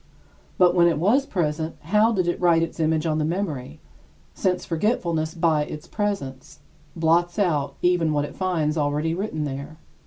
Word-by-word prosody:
But 180 -1 +5
when 175 -1 +5
it 170 - +1
was 235 - +2
present, 160 -3 -2
how 210 +7 +3
did 185 -5 0
it 175 - -1
write 170 -2 +4
its 165 - -5
image 160 0 +1
on 155 -1 0
the - - +1
memory, 155 - -3 0.5
since 180 -1 -1
forgetfulness, 165 -3 -1
by 160 -3 +2
its 150 0 -8
presence, 200 -11 -4 0.3
blots 170 +1 +2
out 160 -9 0
even 175 -3 +3
what 145 -1 0
it - - -10
finds 165 -5 0
already 150 +2 0
written 175 -4 -3
there? 140 +2 -6
165 Hz, 165 wpm, -24 LUFS, 155-180 Hz, 0.5 s, But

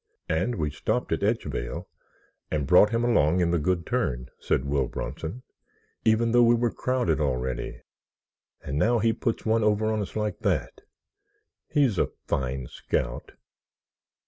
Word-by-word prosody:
"And 90 +10 0
we 75 -6 -1
stopped 75 - -2
at - - 0
Edgevale - - -2 0.6
and 75 -3 -1
brought 90 +5 +6
him 115 +1 0
along 90 -8 +3
in 85 -1 +2
the 85 - +2
Good 85 +2 0
Turn," 60 +1 -1
said 65 - 0
Will 70 -2 +1
Bronson, 95 +11 -5 0.6
"even 115 +1 +3
though 120 +1 +5
we 120 0 +6
were 120 0 +1
crowded 125 -12 0
already. 65 -3 -2 0.8
And 70 +2 -3
now 120 +7 +3
he 115 0 +2
puts 115 - -2
one 110 0 +2
over 105 +1 +2
on 110 - 0
us 100 - -6
like 105 -2 -2
that! - - -1 0.9
He's 130 -10 +2
a - - +2 0.2
fine 65 0 -2
scout!" - - -3
95 Hz, 150 wpm, -26 LUFS, 75-115 Hz, 0.9 s, brought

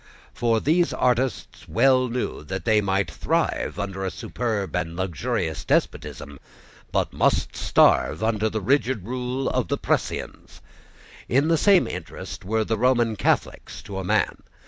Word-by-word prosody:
For 115 -2 +1
these 170 +7 +2
artists 125 0 -1
well 130 +1 +4
knew 120 -9 -3
that 95 +1 -5
they 110 -1 +4
might 100 0 0
thrive - - -1
under 95 -1 -4
a 95 - -1
superb 110 -2 -3
and 85 -2 -2
luxurious 90 - -2
despotism, 70 -2 -2 0.5
but - - 0
must - - +1
starve 90 - +3
under 110 -1 +1
the 110 0 -3
rigid 130 -2 +1
rule 125 +2 -3
of - - 0
the - - -1
precisians. - - -3 0.7
In 140 +6 +3
the 165 - +4
same 195 +2 +4
interest 90 -2 -7
were 110 +3 0
the 110 0 -2
Roman 120 -2 +2
Catholics - - -1
to 95 -1 -6
a - - -4
man. 90 - 0
110 Hz, 145 wpm, -24 LUFS, 95-125 Hz, 0.7 s, well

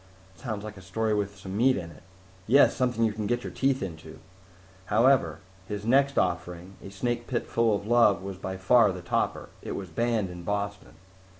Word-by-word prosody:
"Sounds 110 -5 -5
like 105 -2 -8
a - - -11
story 110 +4 -1
with 100 -1 -2
some 95 0 -7
meat 130 +4 +3
in 85 -3 -6
it." - - -16 0.5
"Yes! 135 +6 +5
Something 125 -3 0
you 110 -2 +2
can 105 -1 -3
get 120 +2 -1
your - - -6
teeth 135 -3 +1
into. 80 -3 -8 0.7
However, 125 +6 +3 0.3
his 105 0 -5
next 140 +4 +3
offering, 90 +1 -2
A - - -8
Snake 120 +4 -3
Pit 120 - -2
Full 115 -2 +2
of 100 - -5
Love, 110 -5 +4
was 95 -1 -6
by 95 0 -5
far 105 +3 +4
the 90 -1 -7
topper. 85 - -1
It - - -5
was 95 -2 -6
banned 110 +1 -1
in 90 0 -8
Boston." 100 +2 -4
105 Hz, 195 wpm, -27 LUFS, 95-120 Hz, 0.7 s, Yes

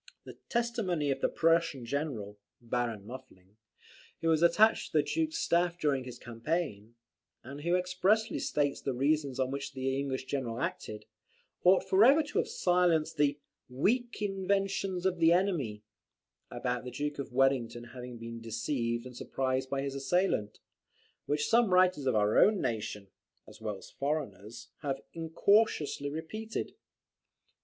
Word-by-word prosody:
The - - -11
testimony 215 - 0
of 135 0 -2
the - - +2
Prussian 165 -5 +2
general, 115 -7 -3 0.2
Baron 115 -3 -2
Muffling, 110 -5 -12 0.6
who 165 - 0
was 160 -1 +3
attached 210 +6 +4
to - - +1
the 150 - +4
Duke's 320 0 -1
staff 175 0 +1
during 145 -6 0
the 125 - -6
campaign, 120 -2 -4 0.5
and 140 +4 -8
who 170 +3 +1
expressly 185 +5 +1
states 145 -1 0
the 135 - -2
reasons 140 0 +1
on 130 0 0
which 140 +1 -4
the 135 0 -1
English 135 -2 -3
general 130 -4 -3
acted, 105 -4 -4 0.6
ought 185 +1 +6
for 190 +3 +5
ever 280 +6 +6
to 300 +8 -2
have 465 - 0
silenced 180 - +2
the 145 -1 +2 0.3
"weak 220 - 0
inventions 195 -1 -1
of 185 -2 +1
the 165 0 +5
enemy" 165 - +1 0.7
about 125 0 -3
the 125 - -6
Duke 145 +2 -4
of 140 - -5
Wellington 125 -2 +1
having 125 -1 -8
been 115 0 -8
deceived 115 +1 -2
and 125 -1 -10
surprised 130 +1 -2
by 135 0 -1
his 140 -1 -3
assailant, 135 - 0 0.7
which 150 0 0
some 230 -3 +4
writers 180 -6 +4
of 130 - +2
our 105 0 +3
own 210 -1 +5
nation, 110 - -3 0.4
as - - -14
well 105 -2 -3
as - - -14
foreigners, 120 - -4
have 140 -3 -2
incautiously 165 -3 +1
repeated. 215 +9 -5
140 Hz, 150 wpm, -31 LUFS, 120-180 Hz, 0.7 s, ought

